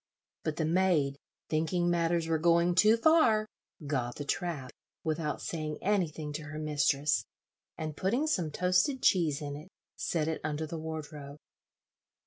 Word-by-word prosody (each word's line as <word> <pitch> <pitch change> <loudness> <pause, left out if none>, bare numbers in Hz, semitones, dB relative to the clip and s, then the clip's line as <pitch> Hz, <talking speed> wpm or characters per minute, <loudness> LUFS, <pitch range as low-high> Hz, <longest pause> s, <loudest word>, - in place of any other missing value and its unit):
But 155 - -2
the 160 - -1
maid, 160 -5 +2 0.3
thinking 165 +3 0
matters 170 -1 +1
were 160 -1 +1
going 170 +1 +4
too 215 +5 +5
far, 230 -6 +4 0.4
got 130 -4 -2
the 145 - -5
trap, 150 -6 -3 0.3
without 155 -1 -2
saying 155 -2 -3
anything 165 -7 -1
to 155 +1 -5
her 150 +1 -7
mistress, 150 -1 +1 0.5
and 155 -2 -4
putting 235 - 0
some 180 - 0
toasted 180 - +1
cheese 160 -5 +3
in 145 -1 -4
it, 155 +5 -10 0.3
set 160 -3 -1
it 160 - -2
under 155 0 -2
the 160 +1 -5
wardrobe. 150 -2 -7
160 Hz, 145 wpm, -30 LUFS, 150-180 Hz, 0.5 s, too